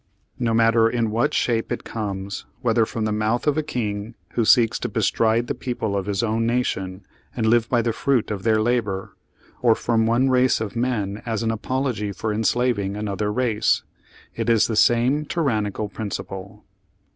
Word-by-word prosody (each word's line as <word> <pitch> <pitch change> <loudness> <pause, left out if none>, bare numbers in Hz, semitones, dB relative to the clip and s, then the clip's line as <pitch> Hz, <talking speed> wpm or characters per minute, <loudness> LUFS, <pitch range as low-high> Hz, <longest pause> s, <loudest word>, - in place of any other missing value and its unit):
No 115 -2 +1
matter 115 0 +4
in 115 -2 0
what 115 +2 +1
shape 115 -2 0
it - - -3
comes, 100 -3 -5 0.2
v/hether 115 -2 +3
from 110 -2 -3
the 110 - 0
mouth 110 +3 0
of 150 -2 +2
a 155 - +1
king 110 -5 -4
who 120 - 0
seeks 115 -1 +4
to - - -3
bestride 115 +1 +1
the 140 - -2
people 120 -5 -3
of 100 0 -2
his 100 +1 -1
own 115 0 0
nation 95 -6 -2 0.3
and 115 - -1
live 115 0 +3
by 120 -2 +2
the 115 - 0
fruit 125 -3 0
of 100 -2 -3
their 110 +1 +2
labor, 110 -4 -1 0.5
or 115 -2 +5
from 115 -1 +1
one 120 +3 +3
race 130 0 +3
of 110 0 -4
men 110 -4 -1
as 115 -2 -2
an 115 - +1
apology 115 -2 -2
for 105 +3 -3
enslaving 110 -2 0
another 105 0 -2
race, 115 -2 +1 0.5
it - - -2
is 115 -2 +4
the 115 - -2
same 120 +7 +3
tyrannical 110 - -1
prin 105 +1 -5
ciple." 95 0 -7
115 Hz, 180 wpm, -23 LUFS, 105-120 Hz, 0.5 s, or